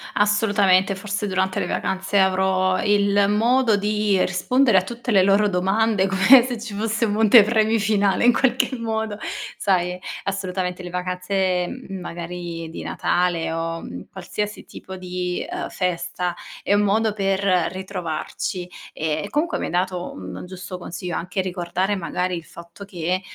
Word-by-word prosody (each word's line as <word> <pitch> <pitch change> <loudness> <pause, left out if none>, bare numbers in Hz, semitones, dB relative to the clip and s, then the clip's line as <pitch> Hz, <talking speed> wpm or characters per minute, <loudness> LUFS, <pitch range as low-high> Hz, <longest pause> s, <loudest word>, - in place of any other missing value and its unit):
Assolutamente, 205 -2 +3
forse 205 +1 -3
durante 190 -1 0
le - - -2
vacanze 190 +1 -1
avrò 185 -1 +2
il 200 -1 +3
modo 230 +1 +3
di 210 -1 +1
rispondere 235 +4 +2
a - - +5
tutte 240 +5 -7
le 195 -3 +5
loro 200 +2 +4
domande, 195 +2 +1
come 195 +7 +7
se 245 -3 -4
ci 220 -2 -7
fosse 220 +2 0
un 205 - -1
monte 220 +1 +7
premi 220 +1 +2
finale 205 0 +2
in 245 - +6
qualche 260 +1 +1
modo. 220 -2 -3 0.4
Sai, 180 -2 +1 0.3
assolutamente 185 -2 -3
le 180 - -6
vacanze 180 0 -1 0.2
magari 175 -2 -6
di 165 - -7
Natale, 175 -2 0
o 165 0 -3 0.3
qualsiasi 210 0 -5
tipo 190 0 -10
di, 180 -1 -3
ehm, 355 0 -4
festa 180 -1 -2 0.3
è - - +1
un 205 - +4
modo 215 +1 +2
per 195 -2 0 0.3
ritrovarci, 180 0 -4 0.2
e 155 +4 -2
comunque 315 +7 0
mi - - -2
hai - - -4
dato 180 0 -1
un 95 -1 -8
giusto 185 0 -8
consiglio, 175 0 -6
anche 180 +2 -3
ricordare 185 +2 -1
magari 180 0 -2
il 170 - -6
fatto 170 +4 -12
che, 185 -1 -2
190 Hz, 150 wpm, -22 LUFS, 180-210 Hz, 0.4 s, come